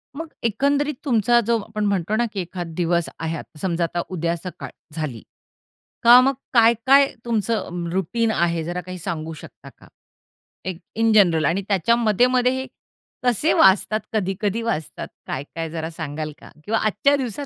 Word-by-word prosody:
मग 325 +2 -5 0.2
एकंदरीत 280 +6 +1
तुमचा 240 -2 +3
जो 235 0 +3
आपण 215 0 -4
म्हणतो 200 0 0
ना 240 - +2
की 200 - -3
एखाद 175 -1 -6
दिवस 170 -1 0
आहे. 165 0 -3
आता 150 - -12
समजा, 175 -2 -1
आता 175 +1 -1
उद्या 170 -2 -1
सकाळ 180 +2 -8 0.3
झाली 145 -8 -4 0.8
का 240 +1 +9
मग 270 +1 +2 0.2
काय-काय 235 +4 +5 0.2
तुमचं 210 -6 -2
रुटीन 220 +5 0
आहे 170 -3 0
जरा 175 +2 -4
काही 185 0 -8
सांगू 160 -1 -4
शकता - - -13
का? - - -18 0.8
एक 185 -3 -4 0.2
इन 225 0 +2
जनरल 170 -7 +4
आणि 170 +7 +1
त्याच्या 200 +3 +2
मध्ये-मध्ये 245 +3 +3
हे 260 0 -3 0.6
कसे 250 +5 +2
वाजतात, 205 +3 +4
कधी-कधी 205 +1 -1
वाजतात, 225 -10 -3 0.2
काय-काय 160 +4 -5
जरा 160 0 -4
सांगाल 155 -1 -5
का? - - -13 0.2
किंवा 225 +2 +1
आजच्या 280 +7 +2
दिवसात 265 +1 -4
200 Hz, 160 wpm, -22 LUFS, 170-235 Hz, 0.8 s, का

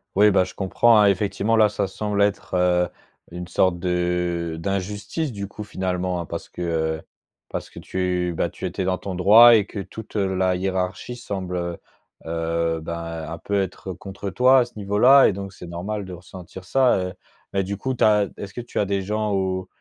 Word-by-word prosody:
Oui, 105 +1 +6
bah, 95 -2 +4
je 90 - -8
comprends, 105 +3 +3
hein. 105 - +6
Effectivement, 100 +3 +1
là, 110 -1 +5
ça 100 -1 -1
semble 105 +1 -2
être, 100 -2 0
heu, 90 -1 +3 0.4
une 90 0 -6
sorte 90 0 +1
de 90 -2 -1
d'injustice, 100 - -3
du 100 -2 -5
coup, 105 +1 -8
finalement, 90 -3 -2
hein, - - -6
parce - - -6
que, - - -9
heu, 80 -2 -1 0.5
parce - - -5
que - - -10
tu, 90 -1 -1
bah, - - +1
tu 95 - -5
étais 95 +2 -3
dans 90 -1 0
ton 95 -2 -5
droit 115 +6 +8
et 105 -2 +3
que 105 - -7
toute, 105 +3 -9
heu, 95 -2 0
la 95 -1 +2
hiérarchie 95 +5 -2
semble, 95 -6 -5
heu 85 -1 -3 0.5
heu, 85 0 -1
ben, 85 0 -5
un 85 - -5
peu 100 -1 -1
être 95 0 -4
contre 100 +2 -7
toi 130 +7 +5
à 120 - +3
ce 120 - -17
niveau 105 0 -2
là. 135 +3 +8
Et - - +1
donc, 100 0 -6
c'est 90 - -11
normal 95 +4 -4
de 90 - -8
ressentir 90 +1 -11
ça, 130 +5 +3
heu. 90 0 -3 0.4
Mais 100 -1 0
du 100 +2 -3
coup, 130 +4 -2
tu - - 0
as 105 -2 +4
est - - -5
ce 100 - -13
que 120 - -5
tu 120 - -9
as 105 - +2
des 100 0 -1
gens 105 +2 -1
au 95 -1 -1
95 Hz, 215 wpm, -23 LUFS, 90-105 Hz, 0.5 s, droit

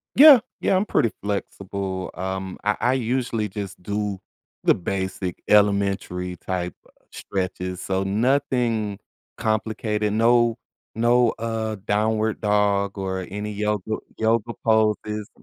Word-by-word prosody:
Yeah. 285 -1 +10 0.2
Yeah, - - +2
I'm 195 - +1
pretty 115 - +2
flexible. 100 -2 -4
Um, 95 0 -4
I 105 0 +1
I 125 +2 +2
usually 120 -3 -1
just 100 -1 -6
do 100 0 -2 0.4
the - - +5
basic 95 -1 -3
elementary 100 -3 +2
type 90 0 -3 0.4
stretches, 90 -1 -4
so 95 0 -1
nothing 115 -1 +1 0.4
complicated. 110 -1 -1
No 120 +1 +4 0.4
no, 120 +1 +4
uh, 110 -1 -2
downward 110 +1 +1
dog 100 -1 +1
or 95 -1 -3
any 105 +2 -4
yoga 105 0 -1 0.2
yoga 115 +1 +1
poses. 110 -1 +1
105 Hz, 115 wpm, -23 LUFS, 95-110 Hz, 0.4 s, Yeah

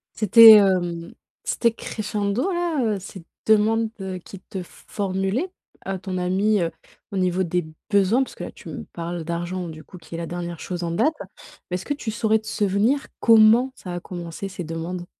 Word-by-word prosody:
C'était, 225 +1 +9
hem, 180 -4 +3 0.3
c'était 235 -1 +1
crescendo 210 - -2
là, 345 -4 0 0.2
heu, - - -5
ces 190 -2 -10 0.2
demandes, 220 +1 +3
heu, 190 -1 -4
qu'il 190 +2 -12
te 190 -1 -7
formulait, 195 - -3 0.4
heu, 195 -1 -2
ton 185 -1 -4
ami, 195 +3 +2
heu, 165 -1 0 0.4
au - - -3
niveau 185 0 +1
des 175 0 -1 0.3
besoins? 200 +5 +3
Parce - - -13
que - - -7
là - - -6
tu - - -13
me - - -6
parles 170 -1 -5
d'argent, 175 +1 -3
du 155 -1 -10
coup 185 - -13
qui 165 - -12
est 165 - -4
la 170 - -4
dernière 175 0 -5
chose 180 -1 -5
en 170 - -2
date, 300 - +2 0.6
mais - - -2
est-ce 185 - -7
que 290 - -1
tu 240 -6 -4
saurais 220 0 +2
te 220 - -17
souvenir 210 +8 +1
comment 230 +3 +6
ça 180 -2 -7
a 175 - -4
commencé 175 +2 -6
ces 185 -2 -6
demandes? 165 +2 -5
190 Hz, 195 wpm, -23 LUFS, 175-220 Hz, 0.6 s, C'était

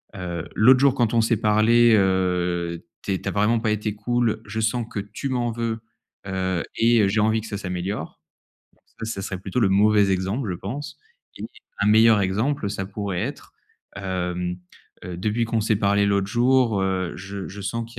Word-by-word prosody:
heu: 90 -3 -5
«L'autre 125 +4 +6
jour 140 -2 +5
quand 120 -2 +1
on 115 - +5
s'est 115 -1 +2
parlé, 115 +2 +4
heu, 90 -3 0 0.2
tu 100 - -1
es 95 - -2
tu - - -6
as - - -3
vraiment 105 +3 +2
pas 110 -2 0
été 105 0 -2
cool, 115 0 0
je 110 +2 -4
sens 115 +1 0
que 100 - -3
tu 105 +7 -5
m'en 120 -2 -1
veux, 115 0 -3 0.5
heu, 95 -2 -1
et 115 0 +4
heu, 100 - +3
j'ai 105 +3 0
envie 110 +1 +2
que 110 - -9
ça 100 - -4
s'améliore». 90 -2 -5 0.8
Ça, - - -2
ça 110 -3 -4
serait 95 -1 -4
plutôt 95 +6 -2
le 105 - +4
mauvais 105 0 +4
exemple 95 +6 -1
je 90 - -3
pense 125 - -6 0.4
et - - -6 0.4
un 100 - +2
meilleur 110 0 +6
exemple, 105 +4 -1
ça 95 -1 -4
pourrait 100 -2 -4
être - - -6 0.4
hem 90 -2 -3 0.5
heu: 90 -1 -6
«Depuis 110 +5 0
qu'on 115 -1 0
s'est 110 -1 +1
parlé 100 0 +2
l'autre 100 -1 +1
jour, 120 -2 +2
heu, 95 -2 -1
je 95 +1 -7
je 100 +2 -9
sens 115 +3 -3
qu'il 115 - -11
105 Hz, 195 wpm, -23 LUFS, 95-115 Hz, 0.8 s, L'autre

